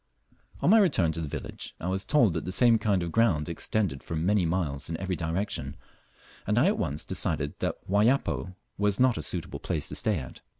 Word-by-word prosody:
On 175 - +4
my 225 - +7
return 95 - +3
to 80 - -4
the 80 - -3
village - - -6
I 85 - -4
was 95 +1 -1
told 120 - +3
that 80 - -3
the 90 - -4
same 115 +3 +4
kind 100 -4 +1
of 85 - -4
ground 95 -10 +2
extended 85 -2 -1
for 85 - -5
many 90 +3 +2
miles 80 -6 -2
in 80 - -3
every 95 +1 -2
direction, 80 -5 -3 0.7
and 105 +2 +1
I 125 - +5
at 200 +3 +2
once 75 -1 -2
decided 70 0 -1
that - - -2
Wayapo 105 -2 +1 0.2
was 105 -1 +1
not 125 -7 +3
a - - -3
suitable 75 - -3
place 80 -4 -2
to - - -5
stay - - +1
at. 65 - -8
95 Hz, 210 wpm, -28 LUFS, 80-110 Hz, 0.7 s, my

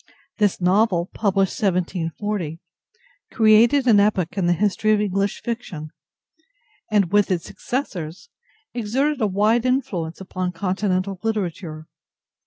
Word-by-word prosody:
This 205 -3 +2
novel 185 -1 +2
(published 195 -3 0
1740) 180 -2 -2 0.7
created 230 +4 +5
an 220 -5 +6
epoch 200 -5 +1
in 190 -3 0
the 175 - +4
history 210 +4 +1
of 210 - +2
English 200 -1 -1
fiction, 180 -10 -5 1.0
and, 205 -5 +2
with 205 0 +3
its 180 -2 -1
successors, 185 - -5 0.5
exerted 255 +5 0
a 215 - +3
wide 210 +4 +2
influence 245 -11 -1
upon 185 -1 -4
Continental 190 +1 -1
literature. 180 -7 -3
200 Hz, 115 wpm, -22 LUFS, 180-215 Hz, 1.0 s, an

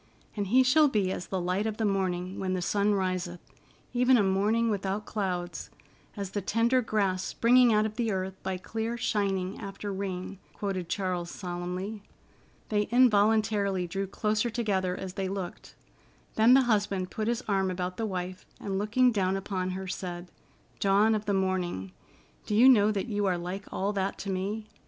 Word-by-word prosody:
"'And 205 -2 -2
he 255 +6 +5
shall 295 +4 +5
be 205 -8 +1
as 180 - -5
the 190 - -2
light 180 +4 0
of 215 -1 -3
the 225 - 0
morning 185 -2 -1
when 185 -1 -1
the 185 - -1
sun 205 +3 +2
riseth, 185 -2 -2 0.5
even 250 +1 +4
a 210 - +3
morning 210 +4 +2
without 200 +1 -2
clouds; 180 -4 -3 0.5
as 200 -2 -4
the 205 - -2
tender 230 +6 +2
grass 200 -5 0
springing 245 +1 +4
out 215 0 +3
of 215 +1 -5
the 230 -3 0
earth 190 0 -2
by 190 -1 -3
clear 225 +5 -4
shining 195 -4 -1
after 200 -1 -5
rain,'" 190 0 -4
quoted 190 -4 -3
Charles 180 -3 -2
solemnly. 180 +4 -5 0.7
They 210 -1 +1
involuntarily 215 -5 +3
drew 195 +3 -3
closer 215 +4 0
together 195 -6 -1
as 190 -1 -6
they 190 0 -2
looked. 190 -2 -6 0.6
Then 230 +3 +6
the 270 - +6
husband 205 -5 0
put 215 0 -3
his 240 +1 -1
arm 195 -2 +1
about 180 0 -3
the 225 - -1
wife 185 0 -5
and, 195 -1 -2
looking 245 +5 +3
down 195 -3 +1
upon 185 -1 -3
her, 190 +1 -4
said: 175 -1 -5 0.5
"Dawn 200 +3 +4
of 215 -1 -1
the 200 - +2
Morning, 180 - -1 0.6
do 210 - 0
you 240 +5 +7
know 215 -5 +6
that 200 -2 -2
you 205 -4 -1
are 180 -2 +1
like 180 +3 -6
all 200 +2 -1
that 195 -1 -1
to 195 - -4
me?" 200 +4 -3
195 Hz, 180 wpm, -28 LUFS, 185-215 Hz, 0.7 s, you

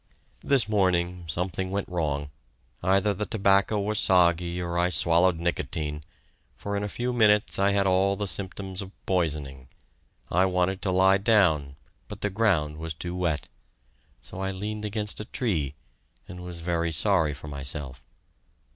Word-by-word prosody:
This 135 -5 +2
morning, 90 -4 +1
something 90 +3 -2
went 100 +1 -2
wrong. 75 -5 -2 0.5
Either 95 +3 +2
the 105 +2 -4
tobacco 100 0 +2
was 105 +1 0
soggy 85 -1 +3
or 85 -1 -3
I 90 +1 +2
swallowed 85 0 +4
nicotine, 80 -3 -2 0.5
for 100 0 -4
in 100 - -1
a 105 - -3
few 125 +4 -2
minutes 105 -4 +3
I 100 0 +4
had 100 -1 +2
all 95 +1 +3
the 105 - -3
symptoms 95 0 -4
of 95 - -7 0.2
poisoning, 75 -8 -2 0.6
I 90 +2 +4
wanted 90 0 0
to 95 - 0
lie 95 +1 +4
down, 90 -10 +3 0.3
but - - -9
the 105 - -1
ground 90 -8 +1
was 80 -1 -5
too 85 +3 -5
wet. 85 -5 -1 0.8
So 95 - -8
I 95 0 -1
leaned 105 +3 -4
against 105 0 -2
a 105 - -5
tree, 80 - -1 0.5
and 90 - -9
was 90 -1 -7
very 85 -1 -1
sorry 80 -3 +2
for 75 - -10
myself. 70 -1 -4
90 Hz, 155 wpm, -26 LUFS, 80-100 Hz, 0.8 s, swallowed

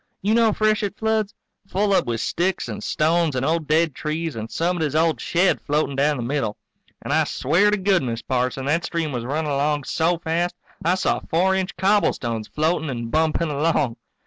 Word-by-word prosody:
You 210 +2 +2
know 230 -1 +4
freshet 215 -1 0
floods? 220 -2 0 0.3
Full 200 +2 +1
up - - +2
with 115 -1 -1
sticks 185 +3 -1
and - - -6
stones 160 -1 +1
and 130 +1 0
old 160 0 0
dead 160 0 +2
trees 155 +2 -3
and 110 0 -5
somebody's 165 -4 -1
old 160 0 +2
shed 180 +2 +2
floatin' 145 -1 0
down 145 +2 +2
the 120 - -3
middle. 130 -4 -2 0.5
And - - -2
I - - +4
swear 175 +10 +2
to 210 - +2
goodness, 165 - 0
Parson, 130 +1 -1
that 160 +5 +1
stream 165 -3 -2
was 120 -3 -4
running 150 +3 -2
along 145 +1 0
so 170 +5 +1
fast 170 +2 -1 0.3
I 175 +3 +3
saw 185 - 0
four 185 +4 +2
inch 190 -1 -2
cobblestones 170 - +1
floating 160 0 0
and 120 -3 -4
bumping 160 +1 +1
along. 145 -4 0
160 Hz, 185 wpm, -22 LUFS, 140-180 Hz, 0.5 s, know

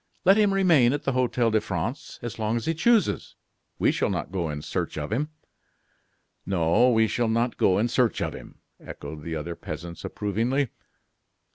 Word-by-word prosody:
"Let 195 +2 +7
him 210 -2 +4
remain 165 -11 +4
at 145 - -3
the 135 - 0
Hotel 125 -2 +1
de 110 -1 +2
France 110 - -4
as 120 -1 -5
long 110 +1 0
as 115 - -4
he 165 - +1
chooses; 220 +7 +2 0.4
we - - +3
shall - - 0
not - - -3
go 90 -4 -2
in 75 -1 -5
search - - -3
of 75 +3 -4
him." 145 +6 -1 1.1
"No! 95 +6 +3
we 110 -2 +4
shall 120 +2 0
not 115 +2 +1
go 95 - +3
in 110 +4 +2
search 120 -2 +1
of - - -2
him," - - -12 0.2
echoed 75 +1 -8
the 80 +2 -4
other 85 +2 -4
peasants, 85 +2 -7
approvingly. 115 +6 -1
115 Hz, 180 wpm, -26 LUFS, 85-135 Hz, 1.1 s, Let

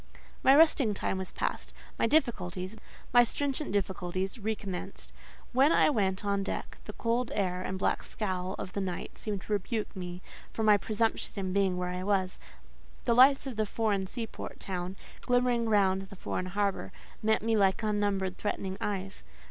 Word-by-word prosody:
My 270 - +7
resting 285 -8 +5
time 190 - -1
was 190 - -5
past; - - -3 0.2
my - - +3
difficulties—my 220 - +1
stringent 285 +4 -1
difficulties—recommenced. 195 +1 -3 0.4
When 270 +5 +5
I 305 - +5
went 195 -5 0
on 200 -1 +1
deck, 195 - -4
the - - -7
cold 235 +1 0
air 185 -2 0
and 190 0 -3
black - - +1
scowl 185 -3 -3
of 185 - -6
the 200 - -1
night 180 -2 -4
seemed 205 -3 -4
to 215 - -3
rebuke 210 +2 -2
me 180 -1 -6 0.3
for 220 - -3
my 210 -1 +7
presumption 220 +2 0
in 190 -2 -2
being 195 -2 +2
where 180 0 -2
I 180 0 -3
was: 190 -1 0 0.7
the 235 - +4
lights 270 +4 +6
of 260 -5 -5
the 215 -1 +1
foreign 200 -3 0
sea 230 +4 -3
port - - -8
town, 185 0 -4 0.3
glimmering 245 -2 +2
round 195 -2 +2
the - - -9
foreign 185 0 -3
harbour, 200 0 -1 0.3
met 220 0 +2
me 225 0 +2
like 195 +1 +3
unnumbered 205 -3 0
threatening 195 -2 -3
eyes. 195 -1 -3
200 Hz, 165 wpm, -30 LUFS, 190-225 Hz, 0.7 s, My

